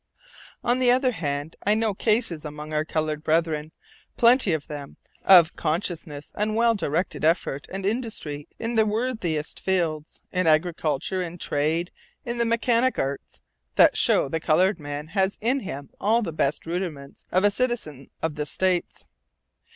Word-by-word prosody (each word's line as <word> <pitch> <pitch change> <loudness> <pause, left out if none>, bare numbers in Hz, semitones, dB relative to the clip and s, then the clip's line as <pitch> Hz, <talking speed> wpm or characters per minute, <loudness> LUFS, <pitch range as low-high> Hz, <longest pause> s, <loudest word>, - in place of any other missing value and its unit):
On 245 +1 +2
the 255 -1 +4
other 255 +1 +3
hand, 145 -6 -3
I 210 +1 +3
know 220 -1 0
cases 210 -6 +1
among 150 0 -7
our 155 0 +1
colored 155 -1 -2
brethren, 160 -1 0 0.5
plenty 240 -3 +5
of 155 -3 -1
them, 145 -3 -8 0.3
of 175 -4 +7
conscientious 155 -3 -3
and 215 +1 -1
well 230 0 +4
directed 175 -4 -2
effort 155 -4 +1
and 195 0 -4
industry 200 - -3
in 230 +1 -3
the 220 -1 +3
worthiest 210 -9 -2
fields, 165 -5 -2
in 185 -2 0
agriculture, 160 +1 +1
in 175 -1 -5
trade, 160 +3 -1 0.3
in 240 -1 -3
the 235 - +2
mechanic 235 +2 +2
arts, 135 +1 -4 0.3
that - - +6
show - - +3
the 160 +4 -2
colored 175 +4 +2
man 145 +1 -6
has 190 +3 0
in 250 +5 +1
him 140 - -7
all 230 +3 +2
the 165 - -4
best 150 -1 0
rudiments 165 -5 -5
of 185 +2 +2
a 205 - +5
citizen 205 - -2
of 160 -1 0
the 150 0 -4
States. 185 +2 -1
170 Hz, 160 wpm, -25 LUFS, 150-215 Hz, 0.5 s, of